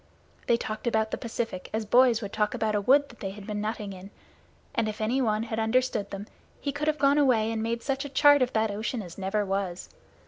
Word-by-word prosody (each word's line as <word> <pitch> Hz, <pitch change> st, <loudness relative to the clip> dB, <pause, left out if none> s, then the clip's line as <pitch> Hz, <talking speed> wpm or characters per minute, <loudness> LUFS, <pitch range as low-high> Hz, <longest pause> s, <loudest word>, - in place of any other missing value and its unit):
They 235 Hz, -, +4 dB
talked 215 Hz, 0 st, -5 dB
about 220 Hz, -1 st, +1 dB
the -, -, -2 dB
Pacific 225 Hz, -5 st, -4 dB
as 220 Hz, 0 st, -1 dB
boys 240 Hz, 0 st, +4 dB
would 200 Hz, -, -6 dB
talk 210 Hz, +1 st, 0 dB
about 220 Hz, -2 st, 0 dB
a 205 Hz, -, +1 dB
wood 280 Hz, +7 st, +4 dB
that 235 Hz, -, -15 dB
they 195 Hz, -, -3 dB
had 200 Hz, +1 st, -9 dB
been 210 Hz, -1 st, -3 dB
nutting 210 Hz, -2 st, -3 dB
in, 190 Hz, +1 st, -10 dB, 0.6 s
and 215 Hz, -, 0 dB
if 215 Hz, -, -6 dB
anyone 220 Hz, -1 st, +1 dB
had 225 Hz, -1 st, -3 dB
understood 225 Hz, -2 st, +1 dB
them 200 Hz, +1 st, -6 dB, 0.3 s
he 280 Hz, -, -2 dB
could 290 Hz, +2 st, -3 dB
have 305 Hz, 0 st, +2 dB
gone 280 Hz, +1 st, +4 dB
away 230 Hz, -6 st, +3 dB
and 225 Hz, -1 st, -2 dB
made 230 Hz, +1 st, -2 dB
such 275 Hz, 0 st, -1 dB
a 285 Hz, -, -6 dB
chart 290 Hz, +1 st, +6 dB
of 255 Hz, -, +2 dB
that 220 Hz, -1 st, +1 dB
ocean 215 Hz, +2 st, -3 dB
as 175 Hz, +1 st, -10 dB
never 200 Hz, +2 st, 0 dB
was. 195 Hz, -2 st, -3 dB
220 Hz, 235 wpm, -27 LUFS, 210-255 Hz, 0.6 s, chart